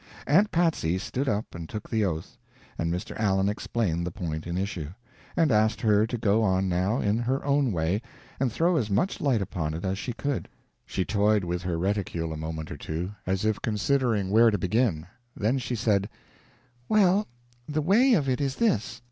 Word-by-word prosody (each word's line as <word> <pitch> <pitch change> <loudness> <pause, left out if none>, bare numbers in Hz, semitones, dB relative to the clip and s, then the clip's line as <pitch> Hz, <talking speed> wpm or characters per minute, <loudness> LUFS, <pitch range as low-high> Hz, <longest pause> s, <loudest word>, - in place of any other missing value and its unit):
Aunt 195 +9 +4
Patsy 160 - +1
stood 130 +8 -2
up 105 +2 -2
and 85 -2 -7
took 105 -1 -6
the 110 -2 0
oath, 90 +6 -3 0.4
and 85 0 -1
Mr. 90 +6 -4
Allen 95 -2 +2
explained 100 -4 -1
the 90 - -2
point 80 -2 -5
in 85 +1 -2
issue, 95 -6 -3 0.5
and 160 -4 +4
asked 110 0 +3
her 105 0 +3
to 120 - -3
go 110 0 +2
on 95 -2 +2
now, 95 +7 +1
in 105 0 +1
her 130 +4 -1
own 140 -3 +2
way, 85 +4 0 0.4
and 130 -2 +1
throw 165 +9 +2
as 110 -7 0
much 110 - 0
light 125 -8 +2
upon 80 -4 -3
it 85 - -5
as 95 +1 -1
she 120 - -3
could. 135 +3 -3 0.4
She 95 - -1
toyed 105 0 +2
with 90 0 -2
her 90 -2 -2
reticule 90 -3 -1
a - - -5
moment 80 0 -5
or - - -6
two, 85 +5 -4 0.2
as 95 +2 0
if 110 -1 0
considering 110 -2 +1
where 115 +2 +6
to 105 - 0
begin, 95 -3 +1 0.3
then 115 +6 +1
she 125 -1 -3
said: 105 -3 +1 0.8
"Well, 205 -1 +4 0.4
the 150 0 0
way 235 - +5
of 145 -8 +1
it 130 +2 0
is 135 -1 -1
this. 130 - 0
105 Hz, 195 wpm, -27 LUFS, 90-130 Hz, 0.8 s, where